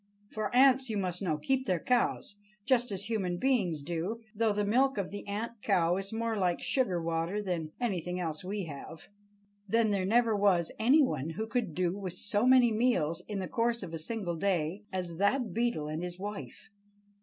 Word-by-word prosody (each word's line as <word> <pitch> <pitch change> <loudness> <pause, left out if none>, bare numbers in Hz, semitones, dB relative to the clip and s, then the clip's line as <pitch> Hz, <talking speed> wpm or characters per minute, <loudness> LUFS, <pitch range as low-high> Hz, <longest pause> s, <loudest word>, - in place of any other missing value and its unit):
For 215 -1 -2
ants, 265 0 +5
you 215 - -1
must 180 -2 -2
know, 165 -6 0
keep 260 - -1
their 185 -2 +2
cows, 240 -2 0 0.3
just 245 -3 +2
as 195 0 -2
human 195 -6 -1
beings 190 - +1
do, 175 +8 -3
though 225 0 +2
the 205 0 0
milk 260 +5 +2
of 195 -2 -2
the 205 0 -7
ant 220 +2 -4
cow 180 -5 +2
is 195 0 -4
more 225 0 -1
like 180 -4 +1
sugar 200 -10 +1
water 165 +4 -1
than 175 -6 -3
anything 180 -6 -2
else 160 -2 -3
we 200 +2 -3
have. 160 0 -9 0.6
Then 225 0 +3
there 190 -2 0
never 230 +1 +3
was 195 -5 +2
any 265 +7 +5
one 155 - -1
who 190 +7 -3
could 225 - -2
do 180 0 0
with 190 -3 -5
so 205 +5 0
many 255 -2 +6
meals 180 -8 +1
in 210 - -4
the 190 -1 -3
course 235 +5 0
of 170 -3 -7
a 165 - -3
single 175 -1 -3
day 180 0 0
as 180 -3 -4
that 205 +2 +1
Beetle 230 -10 0
and 155 +2 -3
his 180 0 -5
wife. 205 +2 -7
200 Hz, 195 wpm, -30 LUFS, 175-230 Hz, 0.6 s, many